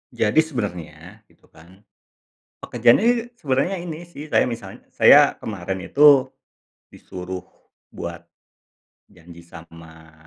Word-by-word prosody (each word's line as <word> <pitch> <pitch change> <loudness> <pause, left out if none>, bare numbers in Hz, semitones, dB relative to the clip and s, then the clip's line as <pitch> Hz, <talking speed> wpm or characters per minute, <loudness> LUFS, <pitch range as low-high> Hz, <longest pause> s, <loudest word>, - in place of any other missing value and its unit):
Jadi 110 +7 +1
sebenarnya 100 - -5
gitu, - - -29
kan, 90 +5 -20 0.8
pekerjaan 120 - +2
ini 240 +1 0
sebenarnya 145 - -2
ini, 170 0 -8
sih, 155 -3 -11
saya - - +2
misalnya 115 -5 -8
saya - - +6
kemarin 95 -2 -5
itu 140 -2 +5 0.6
disuruh 90 0 -9 0.5
buat 85 0 -8 0.8
janji 85 0 -16
sama 80 -1 -15
100 Hz, 105 wpm, -21 LUFS, -, 0.8 s, saya